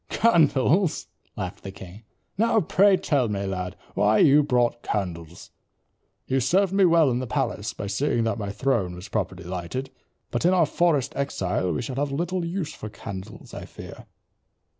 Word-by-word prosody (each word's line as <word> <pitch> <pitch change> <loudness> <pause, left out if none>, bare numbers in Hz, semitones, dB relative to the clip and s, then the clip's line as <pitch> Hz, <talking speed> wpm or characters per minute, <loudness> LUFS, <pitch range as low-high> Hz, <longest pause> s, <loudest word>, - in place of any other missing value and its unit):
"Candles," 165 - +3 0.3
laughed 95 +1 -5
the 100 - -7
king, 95 +1 -11 0.3
"now 225 +2 +3
pray 195 +2 +4
tell 135 -10 +1
me, 100 -1 -2
lad, 90 -2 -4 0.2
why 105 +1 +3
you 145 +4 +6
brought 120 -4 +1
candles. 85 -4 -4 0.7
You 135 0 +1
served 185 +9 +2
me 195 -1 +5
well 165 -5 +5
in 120 - 0
the 130 - -4
palace - - -2
by - - -5
seeing 115 +4 0
that 115 +1 -1
my 100 -1 -3
throne 100 -5 0
was 90 +2 -10
properly - - -3
lighted, 90 +9 -5 0.4
but 120 - -1
in 180 +2 +4
our 170 -3 +4
forest 150 -3 +1
exile 95 -9 -1
we 80 - -2
shall 125 +2 -5
have 145 0 -1
little 175 +5 -2
use 170 -2 -3
for 110 - -8
candles, 95 -3 -9
I - - -7
fear." - - -11
130 Hz, 170 wpm, -25 LUFS, 100-165 Hz, 0.7 s, you